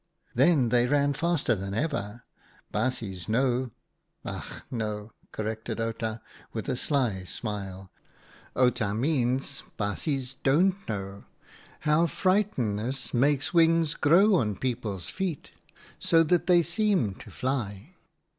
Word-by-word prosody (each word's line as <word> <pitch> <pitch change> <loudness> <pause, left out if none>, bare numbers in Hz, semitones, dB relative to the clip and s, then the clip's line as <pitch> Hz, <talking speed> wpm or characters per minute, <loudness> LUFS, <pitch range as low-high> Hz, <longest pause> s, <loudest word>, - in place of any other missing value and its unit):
" - - -40
Then 135 -1 +4
they 120 +1 +3
ran 145 +1 +2
faster 165 -4 +1
than 100 -1 -4
ever. 120 -6 -2 0.5
Baasjes 105 -6 -2
know 125 +2 +1 0.3
— - - -36
ach - - -6
no! 105 -2 -3
" - - -34
corrected 110 +1 -4
Outa, 115 0 -3 0.3
with 110 - -4
a 130 - 0
sly 125 -8 0
smile; 95 -2 -6 0.3
" - - -26
Outa 125 -5 +2
means 135 +1 0 0.2
baasjes 130 - -2
don't 185 +7 +2
know 100 -1 -5 0.3
— - - -23
how 155 +3 +3
frightenness 135 - 0
makes 140 +5 +2
wings 165 -2 +4
grow 190 +8 +5
on 110 - +2
people's 115 -6 -3
feet, 180 -5 -4 0.5
so 165 -1 +4
that 170 +2 +1
they 175 -2 +6
seem 175 - +1
to - - -11
fly. 125 - -3
125 Hz, 130 wpm, -28 LUFS, 110-155 Hz, 0.5 s, they